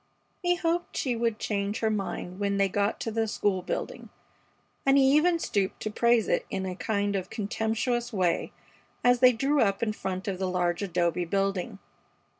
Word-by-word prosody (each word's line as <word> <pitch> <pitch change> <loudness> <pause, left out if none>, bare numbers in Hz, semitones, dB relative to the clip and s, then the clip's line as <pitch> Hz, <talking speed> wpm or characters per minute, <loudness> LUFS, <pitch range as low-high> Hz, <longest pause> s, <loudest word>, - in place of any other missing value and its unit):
He 355 -1 +2
hoped 345 0 -1
she 255 -3 0
would 230 -1 0
change 200 -1 -2
her 220 -1 +2
mind 195 -2 -4
when 200 -1 0
they 195 0 +3
got 200 +2 0
to 225 - -2
the 225 0 0
school 200 -3 0
building, 180 - -5 0.7
and 275 0 +4
he 270 +1 +5
even 340 +3 +4
stooped 200 -11 -1
to 215 - -2
praise 235 0 +3
it - - 0
in 190 -1 -3
a 185 - -3
kind 205 0 -1
of 190 -2 -3
contemptuous 225 +3 -1
way 185 -5 0 0.5
as 245 0 +4
they 255 0 +7
drew 275 +4 +1
up 200 0 +1
in 215 -2 0
front 190 -2 -4
of 190 -2 -2
the 190 -1 -1
large 175 -1 0
adobe 175 -2 0
building. 195 +3 -1
210 Hz, 185 wpm, -28 LUFS, 195-240 Hz, 0.7 s, they